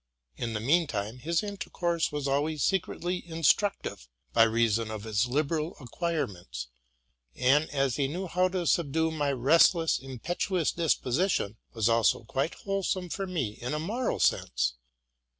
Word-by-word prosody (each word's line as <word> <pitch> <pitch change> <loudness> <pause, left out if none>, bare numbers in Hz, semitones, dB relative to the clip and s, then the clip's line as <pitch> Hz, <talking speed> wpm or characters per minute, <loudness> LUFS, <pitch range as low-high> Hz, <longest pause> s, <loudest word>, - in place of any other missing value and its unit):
In 115 - -3
the 105 - -1
mean 155 +9 +3
time, 110 0 -4
his 165 - 0
intercourse 175 -5 -2
was 145 -1 -2
always 145 +2 0
secretly 180 -1 -1
instructive, 165 - 0 0.3
by - - +4
reason 115 -1 +1
of 110 -2 -5
his 110 +2 +1
liberal 155 +5 -1
acquirements, 105 - -4 0.7
and, 140 +5 +3
as 135 -3 0
he 140 -2 +1
knew 175 +7 -4
how 180 +2 +2
to 180 -1 -2
subdue 160 0 +1
my 145 -3 0
restless, 165 +5 +4
impetuous 160 - -1
disposition, 150 - 0 0.2
was 110 -2 +2
also 115 0 +3
quite 135 +7 -2
wholesome 195 -2 -2
for 195 +3 -3
me 165 - -1
in 125 +5 -2
a - - -1
moral 225 +10 -2
sense. - - +1
150 Hz, 145 wpm, -29 LUFS, 115-170 Hz, 0.7 s, by